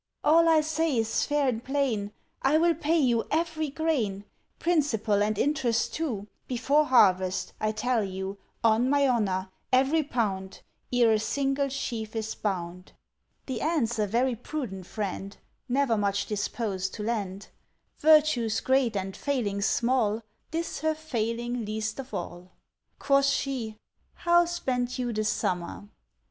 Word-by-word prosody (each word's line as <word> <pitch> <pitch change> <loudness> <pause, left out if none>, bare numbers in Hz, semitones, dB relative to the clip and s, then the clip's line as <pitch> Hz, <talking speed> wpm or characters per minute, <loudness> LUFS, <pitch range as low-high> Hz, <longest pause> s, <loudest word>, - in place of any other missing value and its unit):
"All 330 +2 +5
I 320 -1 +5
say 315 -2 0
is 225 0 0
fair 290 -1 +1
and 235 -2 -1
plain, 255 -7 -1 0.3
I 275 +3 +4
will 335 +1 +4
pay 325 +1 +1
you 240 -6 +2
every 315 -1 -1
grain, 255 -11 -1 0.3
Principal 245 -12 +1
and 210 0 +1
interest 250 -5 +1
too, 235 -11 -3 0.2
Before 275 +5 +2
harvest, 190 -8 +3
I 215 - +1
tell 240 +1 0
you, 190 +1 -5 0.2
On 230 +3 +4
my 280 0 +3
honour 190 -6 0 0.2
every 270 +5 +4
pound, 200 -9 -2 0.3
Ere 240 -2 +4
a 215 - +3
single 275 +4 0
sheaf 230 -5 -4
is 220 0 -2
bound." 180 -2 -4 0.5
The 250 -4 -4
Ant's 265 -8 0
a 210 - +2
very 240 +4 +1
prudent 225 -7 -6
friend, 200 -1 -4 0.3
Never 260 -2 +2
much 200 0 0
disposed 205 -2 -2
to 210 - -5
lend; 200 -4 -3 0.5
Virtues 295 -8 +4
great 260 -4 +2
and 195 0 -4
failings 215 -8 -1
small, 230 -3 +1 0.3
This 330 +1 -3
her 315 +1 0
failing 240 -5 -2
least 220 +2 -3
of 270 -1 -7
all. 180 -2 -6 0.4
Quoth 275 0 +3
she, 250 -6 -1 0.4
"How 345 0 +4
spent 255 -8 -2
you 245 -2 -2
the 215 0 -1
summer?" 180 -1 -2
235 Hz, 140 wpm, -27 LUFS, 210-280 Hz, 0.5 s, All